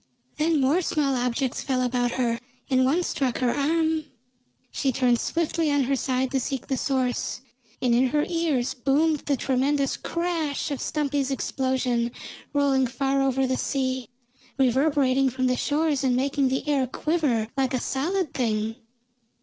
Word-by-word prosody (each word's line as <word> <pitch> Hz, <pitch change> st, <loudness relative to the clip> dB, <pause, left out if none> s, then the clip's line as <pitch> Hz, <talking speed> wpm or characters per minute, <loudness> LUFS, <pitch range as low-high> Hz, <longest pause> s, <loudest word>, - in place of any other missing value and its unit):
Then 310 Hz, 0 st, +2 dB
more 280 Hz, +7 st, +3 dB
small 295 Hz, -5 st, 0 dB
objects 250 Hz, +1 st, -1 dB
fell 255 Hz, -2 st, 0 dB
about 245 Hz, -1 st, 0 dB
her, 235 Hz, -2 st, 0 dB, 0.3 s
and 260 Hz, 0 st, +4 dB
one 320 Hz, +7 st, +2 dB
struck 265 Hz, -7 st, -1 dB
her 250 Hz, -2 st, +1 dB
arm. 315 Hz, +1 st, +1 dB, 0.7 s
She 270 Hz, -, 0 dB
turned 245 Hz, -2 st, +2 dB
swiftly 330 Hz, -1 st, 0 dB
on 285 Hz, -1 st, +2 dB
her 275 Hz, +2 st, +1 dB
side 260 Hz, 0 st, -1 dB
to 270 Hz, -, +1 dB
seek 265 Hz, 0 st, -3 dB
the 265 Hz, -, -1 dB
source, 255 Hz, -2 st, -1 dB, 0.4 s
and 245 Hz, -2 st, +3 dB
in 250 Hz, +2 st, +4 dB
her 295 Hz, +3 st, +1 dB
ears 325 Hz, -8 st, 0 dB
boomed 285 Hz, +4 st, +2 dB
the 280 Hz, -1 st, -1 dB
tremendous 275 Hz, +2 st, +1 dB
crash 330 Hz, -4 st, -2 dB
of 280 Hz, -, -3 dB
Stumpy's 285 Hz, -2 st, -1 dB
explosion, 260 Hz, -3 st, 0 dB, 0.4 s
rolling 275 Hz, -3 st, +2 dB
far 270 Hz, +2 st, 0 dB
over 270 Hz, 0 st, +2 dB
the 260 Hz, 0 st, 0 dB
sea, 260 Hz, -3 st, -1 dB, 0.5 s
reverberating 270 Hz, 0 st, +3 dB
from 255 Hz, +1 st, -2 dB
the 255 Hz, 0 st, +2 dB
shores 295 Hz, +1 st, 0 dB
and 255 Hz, -2 st, +2 dB
making 275 Hz, +1 st, +1 dB
the 265 Hz, +3 st, -2 dB
air 275 Hz, -3 st, +2 dB
quiver 265 Hz, -7 st, 0 dB
like 265 Hz, -1 st, 0 dB
a -, -, 0 dB
solid 320 Hz, +6 st, -1 dB
thing. 225 Hz, -2 st, -1 dB
270 Hz, 160 wpm, -25 LUFS, 255-290 Hz, 0.7 s, and